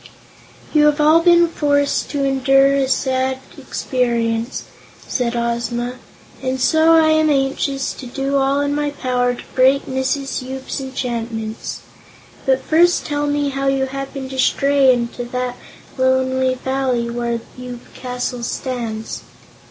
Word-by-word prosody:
"You 300 -1 +5
have 295 0 +2
all 305 +2 +6
been 345 0 +5
forced 285 -3 0
to 285 -2 -1
endure 270 0 +4
a 275 -1 +1
sad 260 0 0 0.2
experience," 235 -2 -1 0.4
said 245 -2 -1
Ozma, 235 +1 -2 0.4
"and 260 0 -2
so 315 +5 +4
I 320 -1 +5
am 315 0 +3
anxious 270 -1 0
to 255 - -9
do 275 +2 -1
all 275 +1 +2
in 285 0 0
my 295 0 0
power 250 -3 0
to - - -10
break 265 +2 +4
Mrs. 265 +1 -2
Yoop's 265 +2 -5
enchantments. 230 -4 -4 0.7
But 265 0 +2
first 345 +2 +3
tell 290 0 -1
me 290 0 0
how 275 0 -2
you 270 0 +2
happened 275 0 -6
to 265 - -5
stray 275 0 +4
into 245 0 -2
that 250 0 -3 0.4
lonely 260 0 +2
Valley 255 -2 -1
where 235 0 -2 0.2
Yoop 250 -1 -9
Castle 250 -1 -4
stands." 230 -2 -4
265 Hz, 135 wpm, -19 LUFS, 250-280 Hz, 0.7 s, all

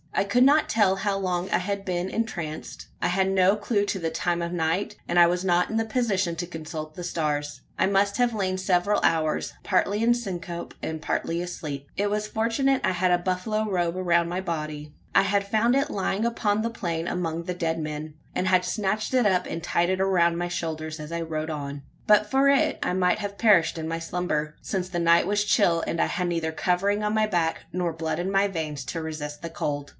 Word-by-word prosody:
I - - +2
could 200 +5 +3
not 290 +3 +5
tell 200 -3 +3
how 195 0 0
long 185 -1 -1
I - - +3
had 200 +1 -3
been 180 0 -1
entranced. 175 -10 -4
I - - +2
had 190 +2 +1
no 190 +1 +4
clue 205 0 0
to 205 - -2
the 165 -2 -1
time 170 +1 -1
of 170 0 -3
night, 170 +3 -1
and 175 - 0
I 175 - +9
was 180 +2 -1
not 175 -1 +2
in 225 - 0
a 225 - 0
position 215 -7 0
to 175 +1 -3
consult 155 -2 -7
the 180 - -6
stars. 150 -4 -2 0.2
I - - +4
must 200 +1 +2
have 245 -1 +2
lain 190 -3 -1
several 185 +2 +2
hours, 155 -2 +1
partly 205 +2 +1
in 240 +1 +5
syncope, 175 -7 -5
and 160 -1 -4
partly 165 +3 -1
asleep. 150 -5 -6
It 205 +1 0
was 210 +1 -1
fortunate 235 +5 +1
I - - +2
had 180 0 +1
a 175 - +5
buffalo 195 +4 -1
robe 175 -3 0
around 170 -2 +2
my 180 +2 -2
body. 155 -4 -4 0.2
I - - +7
had 200 +1 +1
found 225 +4 +2
it 275 +1 +1
lying 200 +2 -1
upon 215 -3 +1
the 230 - -1
plain 170 -6 -3
among 170 -2 -2
the 180 - -3
dead 165 -2 -1
men; 155 0 -5 0.2
and 185 - 0
had 185 -1 +3
snatched 210 +4 -1
it 250 -3 +3
up, 185 -3 +3
and 165 - -5
tied 175 0 +1
it 185 0 0
around 175 -3 +3
my 175 +1 -2
shoulders 160 -2 -4
as 150 +1 -7
I 170 0 -2
rode 160 -1 -3
on. 140 -2 -5 0.2
But 210 0 +4
for 270 +3 +4
it, 280 -1 +3
I - - 0
might 180 +2 +2
have 200 -1 -5
perished 190 -8 +4
in 160 0 -4
my 165 0 -2
slumber: 165 -3 -2
since 185 -2 -3
the 175 -2 -2
night 170 0 +4
was 205 +1 +1
chill, 175 -6 +3
and 165 - 0
I - - +3
had 180 -3 -1
neither 165 -2 -1
covering 190 +5 +1
on 210 0 0
my 215 0 +2
back, 170 -5 0
nor 175 -2 -1
blood 160 0 -3
in 180 +2 -1
my 195 +1 +3
veins, 155 -6 -4
to 165 +7 -4
resist 150 -2 -5
the 170 - -5
cold. 145 -3 -3
180 Hz, 225 wpm, -26 LUFS, 165-200 Hz, 0.2 s, I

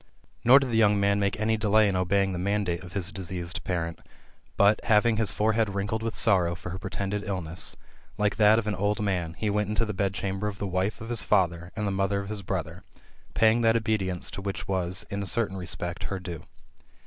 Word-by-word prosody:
Nor 125 +3 +8
did 135 -3 +1
the 115 - +2
young 105 -2 +4
man 100 0 +2
make 100 -1 0
any 110 +1 +1
delay 110 0 +3
in 100 - 0
obeying 95 +1 +1
the 90 - -3
mandate 95 -2 -1
of 90 -1 -11
his 90 -4 -2
diseased 90 -3 -5
parent; 85 -2 -3 0.6
but, 100 +2 +4
having 110 +1 +3
his 110 -2 +3
forehead 110 -1 +1
wrinkled 100 +3 -2
with 115 -1 -3
passion 85 -3 +3
Ffor 90 0 -7
her 95 - -5
pretended 100 +1 -3
illness], 90 -5 -2 0.4
like 105 -1 0
that 110 0 +6
of 115 - 0
an 105 - -1
old 100 +3 0
man, 90 -5 -1
he 105 -2 -1
went 105 0 0
into 105 +2 +1
tne 105 - -4
bed 100 0 -1
chamber 95 +1 -2
of 100 -1 -5
the 100 - -4
wife 95 +3 -1
of 115 - -7
his 120 -3 +2
father 90 -3 +1
and 105 - -2
the 100 - 0
mother 95 +1 0
of 100 0 -6
his 105 -2 -4
brother, 90 -3 -4 0.5
paying 110 +1 +4
that 115 0 +4
obedience 105 -5 -1
to 100 - -6
her - - -12
which 100 - -4
was, 95 -1 -2
in 100 0 -2
a 100 - -3
certain 105 -3 0
respect, 90 -1 -3
her 100 - -3
due. 90 -3 -7
100 Hz, 225 wpm, -27 LUFS, 95-105 Hz, 0.6 s, Nor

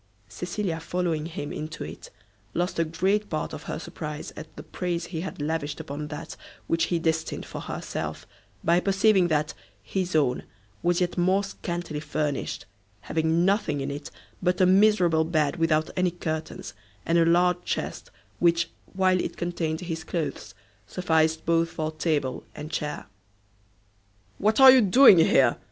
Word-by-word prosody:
Cecilia, 175 - -3
following 165 -2 -2
him 150 -3 -6
into 155 +1 -5
it, - - -9 0.5
lost 175 0 -1
a - - +4
great 190 +6 0
part 155 -1 -3
of - - -6
her - - -2
surprise 155 -2 -7
at 155 - -10
the - - -8
praise 175 -2 -3
he 170 -2 -5
had 190 - -6
lavished 145 -1 -2
upon 145 +2 -5
that 150 +1 -7 0.3
which 165 0 +1
he 175 - 0
destined 160 -1 -1
for - - -7
herself, - - -5 0.4
by 170 +2 +4
perceiving 195 0 +3
that 155 -2 0 0.3
his 180 - -2
own 135 -5 +2 0.4
was 175 +1 +1
yet 180 0 0
more 190 +3 +3
scantily 175 -5 -5
furnished, 150 -5 -3 0.4
having 160 - +1
nothing 195 -7 +1
in 140 +1 -3
it 145 +1 -6 0.3
but 180 0 +1
a 185 - +6
miserable 185 -4 +4
bed 155 -2 0
without 160 -1 +1
any 185 -1 +2
curtains, 160 -8 -5 0.3
and 170 +1 +3
a - - +5
large 175 +1 +3
chest, - - -4 0.3
which, 170 -1 +2 0.2
while 185 -1 +3
it - - -5
contained 170 -2 -2
his 165 -2 -4
clothes, 165 -1 -4 0.3
sufficed 160 -2 +1
both 165 0 +2
for 155 -1 -3
table 155 -4 -1
and 155 +2 -7
chair. 150 -3 -3 1.3
"What 215 +4 +2
are 260 -1 +9
doing 210 -1 +7
here?" 135 -6 +4
165 Hz, 155 wpm, -26 LUFS, 155-180 Hz, 1.3 s, are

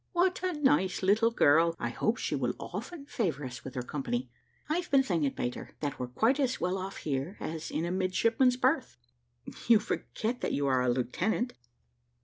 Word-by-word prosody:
"What 365 +1 +2
a 365 -1 0
nice 190 - +2
little 215 +4 +4
girl! 165 -5 +4
I - - -1
hope - - 0
she - - -2
will - - 0
often 330 -5 -6
favour 170 - -2
us 120 -2 -7
with 130 - -8
her 125 - -2
company. 240 - -3 0.4
I've 345 +3 -1
been 275 -1 +5
thinking, 165 - +1
Peter, 125 -1 -5
that 145 -2 -3
we're 125 - -2
quite 225 - +2
as 260 -2 +1
well 180 +2 0
off 190 +1 -5
here, 145 +7 -3
as 160 0 -5
in 160 - -2
a 175 - -2
midshipman's 225 +7 +2
berth." 260 - +1 0.7
"You 230 -1 +8
forget 225 +3 -3
that - - -1
you 140 - 0
are 130 -2 +3
a 125 - +2
lieutenant." 180 - 0
190 Hz, 185 wpm, -30 LUFS, -, 0.7 s, You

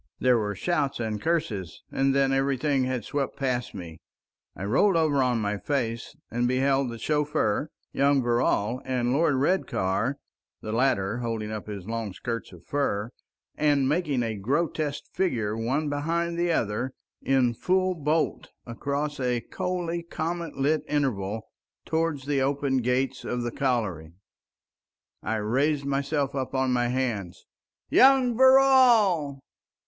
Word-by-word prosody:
There 125 -2 +4
were 105 -1 -2
shouts 150 -7 -1
and 110 -3 -3
curses, 110 - -2
and 135 0 +1
then 135 -1 +3
everything 135 0 +1
had 130 -3 -2
swept 140 -2 -2
past 125 -4 -2
me. 85 -4 -8 0.6
I - - -7
rolled 170 - +3
over 150 -4 +2
on 125 -2 +1
my 105 -1 -2
face 115 -5 -2 0.2
and 120 +1 +1
beheld 135 +1 +2
the 115 - -6
chauffeur, 150 -1 0 0.2
young 140 -1 +3
Verrall, 120 0 +1
and 125 -1 0
Lord 150 0 +3
Redcar—the 130 - -2
latter 115 -3 +1
holding 115 -3 -3
up 110 -1 -6
his 100 -4 -6
long 115 -2 -4
skirts 115 +4 -5
of 90 -2 -15
fur, 120 -6 -1 0.4
and 145 -3 +2
making 145 -4 0
a 115 -1 -2
grotesque 145 - -1
figure—one 120 - -1
behind 165 +4 -1
the 175 0 +1
other, 120 -1 -1 0.3
in 130 -3 +2
full 185 +8 +1
bolt 155 -1 -1 0.2
across 140 +5 -3
a 125 -2 0
coldly 175 +1 -3
comet 170 0 -4
lit 145 +3 +2
interval, 110 -8 -1 0.4
towards 160 -4 -1
the 140 -1 +1
open 140 0 +1
gates 125 +2 0
of 125 0 -2
the 120 - -2
colliery. 105 - -1 1.1
I 110 - -2
raised 135 +7 0
myself 140 0 -1
up 135 -1 -3
on 130 -1 +1
my 120 -1 +1
hands. 120 -8 -3 0.5
Young 260 -2 +6
Verrall! 240 - +5
135 Hz, 135 wpm, -26 LUFS, 115-150 Hz, 1.1 s, Young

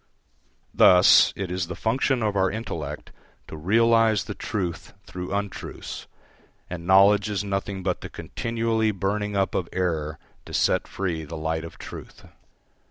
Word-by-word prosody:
Thus, 90 0 +7
it 95 -3 -4
is 90 -1 -2
the 90 - -6
function 125 +2 0
of 105 -2 0
our 95 -1 +3
intellect 80 -9 -5 0.4
to - - -8
realise 110 +4 +3
the - - -6
truth 90 -5 -4
through 90 0 -7
untruths, 100 -1 -5 0.6
and 85 -1 -6
knowledge 100 +2 +5
is 100 -1 -1
nothing 100 -1 -3
but 90 -1 -1
the - - -7
continually 115 -1 -1
burning 105 +1 -2
up 95 0 +1
of 90 -3 -2
error 80 -5 -2 0.3
to - - -5
set - - +2
free 85 -5 -3
the 80 +2 -7
light 80 +1 -2
of 85 - -10
truth. - - -10
95 Hz, 150 wpm, -25 LUFS, 85-105 Hz, 0.6 s, Thus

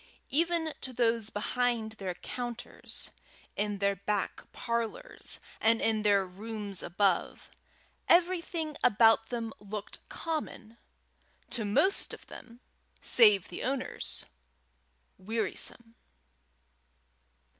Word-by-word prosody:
Even 330 +1 +1
to 260 - -5
those 230 -2 +1
behind 235 +1 0
their 195 -4 -4
counters, 240 +4 -6 0.4
in 205 0 -1
their 200 0 +2
back 200 0 -3
parlours, 235 - -4 0.2
and 225 0 +4
in 220 -1 +2
their 200 -2 +4
rooms 205 0 -5
above, 190 0 0 0.6
everything 340 -3 +2
about 225 0 +5
them 230 -2 -3
looked 205 0 -6
common 290 -8 -5 0.7
to 230 - -1
most 370 - +4
of - - -18
them, 240 0 -12 0.4
save 210 -6 +6
the 175 - -6
owners, 265 +1 -1 0.9
wearisome. 225 +2 -2
225 Hz, 95 wpm, -31 LUFS, 205-250 Hz, 0.9 s, save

